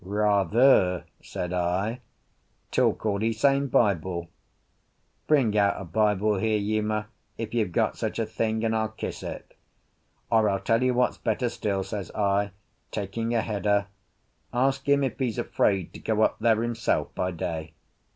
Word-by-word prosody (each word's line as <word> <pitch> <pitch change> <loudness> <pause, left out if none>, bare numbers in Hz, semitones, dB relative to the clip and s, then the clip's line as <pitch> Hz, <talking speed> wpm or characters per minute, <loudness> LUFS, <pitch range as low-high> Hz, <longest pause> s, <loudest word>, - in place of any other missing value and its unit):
"Rather!" 100 0 +3 0.2
said 90 0 -5
I. 95 +7 -1 0.7
"Talk - - +1
all 100 -1 0
e 115 +1 +2
same 140 +5 +2
Bible. 90 - +1 1.0
Bring 130 -9 +3
out 100 -1 +3
a 100 - -6
Bible 105 +3 +1
here, 110 +2 +1
Uma, 105 +1 -1 0.3
if 115 -1 -5
you've 110 -6 0
got - - 0
such - - -2
a 115 - 0
thing, 110 0 -1
and 110 0 +1
I'll 110 -1 0
kiss 110 - -6
it. - - -8 0.8
Or, 110 -2 +4
I'll 100 -1 0
tell 115 +4 +1
you 130 -1 +2
what's 125 0 +1
better 120 +2 0
still," 100 -4 -2
says 100 0 -5
I, 100 0 +1 0.4
taking 115 +3 -3
a 115 - +3
header, 100 -2 0 0.6
"ask 135 +3 0
him 140 0 +4
if 135 - -2
he's 125 -5 -1
afraid 95 -4 0
to - - -9
go 110 -1 +1
up - - +1
there 110 -1 +3
himself 115 -1 -1
by 90 - -1
day." 80 -2 -4
110 Hz, 160 wpm, -26 LUFS, 100-115 Hz, 1.0 s, Or